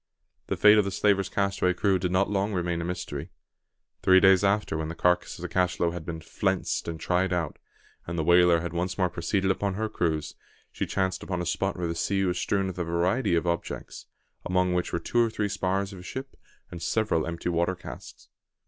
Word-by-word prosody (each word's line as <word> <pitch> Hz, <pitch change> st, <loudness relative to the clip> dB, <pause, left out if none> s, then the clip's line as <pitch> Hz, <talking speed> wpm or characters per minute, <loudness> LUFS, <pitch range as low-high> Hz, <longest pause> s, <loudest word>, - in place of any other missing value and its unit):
The -, -, -2 dB
fate 105 Hz, 0 st, +7 dB
of -, -, +4 dB
the 100 Hz, -, -2 dB
slaver's 100 Hz, 0 st, +1 dB
castaway 100 Hz, -2 st, 0 dB
crew 95 Hz, +1 st, +2 dB
did 90 Hz, 0 st, -1 dB
not 95 Hz, +2 st, +2 dB
long 100 Hz, +1 st, -1 dB
remain 85 Hz, -2 st, -1 dB
a -, -, -3 dB
mystery. 85 Hz, -3 st, -5 dB, 0.7 s
Three 95 Hz, 0 st, +6 dB
days 95 Hz, 0 st, +5 dB
after, 100 Hz, -3 st, +1 dB
when 80 Hz, 0 st, -2 dB
the 80 Hz, -, -5 dB
carcass 90 Hz, 0 st, +1 dB
of -, -, -10 dB
the -, -, -2 dB
cachalot 90 Hz, -2 st, 0 dB
had 85 Hz, -2 st, -7 dB
been 80 Hz, -1 st, -5 dB
"flensed" -, -, -1 dB
and 80 Hz, -1 st, -4 dB
tried 90 Hz, +2 st, +1 dB
out, 85 Hz, -4 st, -2 dB, 0.5 s
and 85 Hz, 0 st, -4 dB
the 80 Hz, -, 0 dB
whaler 85 Hz, 0 st, +5 dB
had 85 Hz, 0 st, -5 dB
once 90 Hz, +1 st, -2 dB
more 90 Hz, -2 st, +1 dB
proceeded 95 Hz, +3 st, 0 dB
upon 100 Hz, 0 st, -1 dB
her 110 Hz, +2 st, -1 dB
cruise, 80 Hz, -7 st, -1 dB, 0.4 s
she -, -, -3 dB
chanced 95 Hz, -1 st, -1 dB
upon 90 Hz, -2 st, -3 dB
a 90 Hz, -, -2 dB
spot 95 Hz, +4 st, -1 dB
where 90 Hz, -, -2 dB
the 85 Hz, -, -1 dB
sea 95 Hz, +3 st, 0 dB
was 90 Hz, -1 st, 0 dB
strewn 95 Hz, +1 st, 0 dB
with 95 Hz, -1 st, -5 dB
a -, -, +1 dB
variety 85 Hz, +5 st, +1 dB
of 85 Hz, -, 0 dB
objects, 85 Hz, 0 st, -4 dB, 0.4 s
among 90 Hz, 0 st, +1 dB
which 90 Hz, 0 st, -1 dB
were -, -, 0 dB
two 120 Hz, +7 st, +1 dB
or 115 Hz, -, +1 dB
three 110 Hz, -2 st, -1 dB
spars 95 Hz, +1 st, -1 dB
of 95 Hz, -, -9 dB
a -, -, -9 dB
ship, 130 Hz, +8 st, -7 dB, 0.4 s
and 85 Hz, -, -7 dB
several 105 Hz, -4 st, 0 dB
empty 85 Hz, +1 st, -3 dB
water 85 Hz, +2 st, +1 dB
casks. 90 Hz, -, -11 dB
90 Hz, 220 wpm, -27 LUFS, 85-95 Hz, 0.7 s, fate